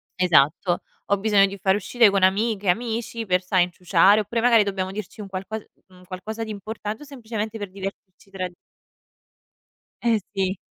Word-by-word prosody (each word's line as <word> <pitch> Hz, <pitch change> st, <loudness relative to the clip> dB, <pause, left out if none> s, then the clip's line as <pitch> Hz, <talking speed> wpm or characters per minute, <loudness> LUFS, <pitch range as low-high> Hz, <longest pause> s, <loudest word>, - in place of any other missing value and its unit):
esatto. 175 Hz, 0 st, +3 dB, 0.3 s
Ho 200 Hz, -, +2 dB
bisogno 205 Hz, -1 st, +4 dB
di 200 Hz, 0 st, -5 dB
far 190 Hz, -1 st, +3 dB
uscite 230 Hz, +2 st, +4 dB
con 195 Hz, -1 st, +1 dB
amiche, 205 Hz, +1 st, +2 dB
amici 230 Hz, +2 st, -1 dB
per 180 Hz, -2 st, +2 dB
sai, 180 Hz, 0 st, +3 dB
inciuciare 180 Hz, +3 st, +4 dB
oppure 230 Hz, +3 st, -2 dB
magari 230 Hz, -2 st, +5 dB
dobbiamo 190 Hz, -2 st, -3 dB
dirci 210 Hz, +1 st, -7 dB
un 200 Hz, -, -7 dB
qualco 195 Hz, +3 st, -5 dB, 0.3 s
un 180 Hz, -1 st, -18 dB
qualcosa 215 Hz, +5 st, -6 dB
di 220 Hz, -, -7 dB
importante 215 Hz, +3 st, -6 dB
o -, -, -11 dB
semplicemente 225 Hz, -5 st, -5 dB
per 205 Hz, -2 st, -6 dB
divertirci 195 Hz, 0 st, -9 dB
tra 185 Hz, -1 st, -3 dB
di 180 Hz, -, -18 dB, 1.5 s
Eh, 230 Hz, -2 st, +3 dB, 0.2 s
sì. 190 Hz, 0 st, 0 dB
200 Hz, 170 wpm, -24 LUFS, 185-220 Hz, 1.5 s, magari